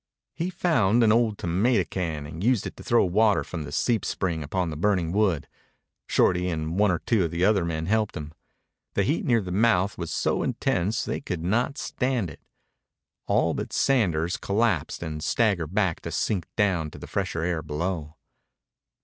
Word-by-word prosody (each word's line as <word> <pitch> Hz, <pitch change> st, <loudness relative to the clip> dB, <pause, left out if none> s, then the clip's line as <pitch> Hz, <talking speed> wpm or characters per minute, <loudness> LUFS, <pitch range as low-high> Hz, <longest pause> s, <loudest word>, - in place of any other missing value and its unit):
He 170 Hz, +3 st, -2 dB
found 120 Hz, -, +2 dB
an 110 Hz, -, +5 dB
old 115 Hz, -2 st, +2 dB
tomato 95 Hz, +5 st, +2 dB
can 80 Hz, -5 st, -3 dB
and 80 Hz, +4 st, -7 dB
used 120 Hz, -2 st, +2 dB
it -, -, -6 dB
to -, -, -10 dB
throw 120 Hz, -3 st, +3 dB
water 105 Hz, +4 st, +3 dB
from 80 Hz, -4 st, -6 dB
the 75 Hz, -, -8 dB
seep 115 Hz, -, +1 dB
spring 85 Hz, -4 st, -2 dB
upon 85 Hz, +3 st, -2 dB
the -, -, -5 dB
burning 90 Hz, -1 st, +1 dB
wood. 95 Hz, -6 st, +1 dB, 0.6 s
Shorty 90 Hz, 0 st, +2 dB
and 80 Hz, +2 st, -2 dB
one 105 Hz, -1 st, +4 dB
or 90 Hz, -, +2 dB
two 105 Hz, -2 st, +1 dB
of -, -, -2 dB
the 85 Hz, +3 st, 0 dB
other 100 Hz, -3 st, +3 dB
men 80 Hz, -1 st, -2 dB
helped 110 Hz, +2 st, 0 dB
him. 75 Hz, 0 st, -7 dB, 0.6 s
The 100 Hz, -, +2 dB
heat 150 Hz, -, 0 dB
near 120 Hz, -6 st, +3 dB
the 90 Hz, -, -5 dB
mouth 100 Hz, -1 st, +2 dB
was 85 Hz, -2 st, -4 dB
so -, -, 0 dB
intense 100 Hz, +7 st, 0 dB
they -, -, -3 dB
could 90 Hz, -10 st, -4 dB
not 120 Hz, +9 st, 0 dB
stand 125 Hz, -, -1 dB
it. -, -, -14 dB, 0.9 s
All -, -, +2 dB
but -, -, -4 dB
Sanders 90 Hz, -, +1 dB
collapsed 100 Hz, -7 st, 0 dB
and 75 Hz, -2 st, -5 dB
staggered 95 Hz, -7 st, +1 dB
back 95 Hz, -6 st, +1 dB
to 85 Hz, -, -6 dB
sink 85 Hz, +3 st, -1 dB
down 95 Hz, -7 st, +1 dB
to -, -, -12 dB
the -, -, -9 dB
fresher 80 Hz, -, -2 dB
air 85 Hz, -2 st, -1 dB
below. 80 Hz, +1 st, -3 dB
95 Hz, 185 wpm, -26 LUFS, 80-110 Hz, 0.9 s, an